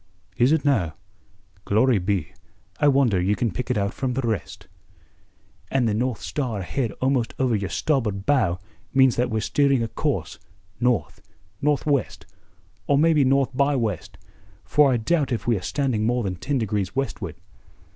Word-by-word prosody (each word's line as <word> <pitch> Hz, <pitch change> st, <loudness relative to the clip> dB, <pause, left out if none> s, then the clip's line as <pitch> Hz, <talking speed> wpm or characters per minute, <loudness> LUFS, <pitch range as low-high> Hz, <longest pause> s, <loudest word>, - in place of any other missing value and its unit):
"Is 120 Hz, +6 st, +3 dB
it 160 Hz, -2 st, +2 dB
now? 95 Hz, -, +1 dB, 0.7 s
Glory 110 Hz, +3 st, +3 dB
be, 95 Hz, -3 st, -2 dB, 0.5 s
I 145 Hz, -, +4 dB
wonder 130 Hz, -9 st, +3 dB
ye 100 Hz, +3 st, +1 dB
can 115 Hz, -1 st, -1 dB
pick 125 Hz, +7 st, -5 dB
it 125 Hz, -, +1 dB
out 100 Hz, 0 st, -1 dB
from 130 Hz, -2 st, -2 dB
the 130 Hz, -2 st, -1 dB
rest." 110 Hz, -4 st, -4 dB, 1.0 s
"And 130 Hz, -3 st, +1 dB
the 110 Hz, -, +1 dB
North 120 Hz, +1 st, -1 dB
Star 120 Hz, -9 st, -3 dB
ahead 115 Hz, +5 st, -2 dB
almost 130 Hz, -3 st, 0 dB
over 130 Hz, -3 st, +1 dB
your 100 Hz, -3 st, -2 dB
starboard 110 Hz, -10 st, -1 dB
bow 110 Hz, -12 st, +2 dB, 0.4 s
means 130 Hz, -2 st, +5 dB
that 125 Hz, -, +1 dB
we're 110 Hz, 0 st, -1 dB
steering 140 Hz, +1 st, +2 dB
a -, -, -1 dB
course, 115 Hz, -, -3 dB, 0.4 s
north, 125 Hz, -3 st, 0 dB, 0.4 s
northwest, 145 Hz, -1 st, 0 dB, 0.6 s
or 140 Hz, -, +3 dB
maybe 155 Hz, -1 st, +4 dB
north 135 Hz, 0 st, +2 dB
by 140 Hz, +2 st, +2 dB
west, 110 Hz, -, -3 dB, 0.5 s
for 145 Hz, -2 st, +4 dB
I 125 Hz, -, +2 dB
doubt 140 Hz, +4 st, 0 dB
if 120 Hz, -, -2 dB
we 120 Hz, -, +2 dB
are 95 Hz, -, -3 dB
standing 130 Hz, 0 st, -1 dB
more 120 Hz, 0 st, +1 dB
than 95 Hz, -2 st, -2 dB
ten 140 Hz, +9 st, -1 dB
degrees 105 Hz, -4 st, -2 dB
westward." 110 Hz, -, -3 dB
125 Hz, 165 wpm, -24 LUFS, 105-135 Hz, 1.0 s, means